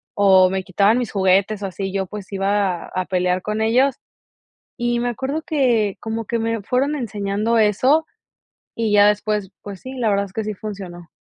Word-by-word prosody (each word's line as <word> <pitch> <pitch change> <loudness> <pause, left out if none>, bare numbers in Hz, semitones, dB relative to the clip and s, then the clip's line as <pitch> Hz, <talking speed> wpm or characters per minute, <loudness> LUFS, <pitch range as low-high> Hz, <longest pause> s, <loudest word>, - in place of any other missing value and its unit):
o 190 -2 +5
me 190 0 -2
quitaban 200 +5 +2
mis 245 - -3
juguetes 195 +2 +2
o - - -1
así 195 +1 -5
yo, 195 -1 -1
pues, 205 0 -9
iba 195 -2 0
a 185 -1 -3
pelear 180 0 0
con 215 +1 -2
ellos, 250 +5 +3 0.8
y 240 0 0
me 245 - -1
acuerdo 270 +6 -3
que, 240 -9 +1
como 225 0 -4
que 235 - -1
me 225 -1 -1
fueron 275 +6 0
enseñando 210 0 -1
eso, 255 +10 +3 0.7
y 225 -2 0
ya 205 0 +6
después, 210 -1 -1
pues 200 -3 -8
sí, 260 - -7
la 230 -3 +1
verdad 200 0 +1
es 190 - -16
que 220 - -2
sí 215 -1 -3
funcionó. 185 -4 -8
210 Hz, 185 wpm, -21 LUFS, 195-230 Hz, 0.8 s, ya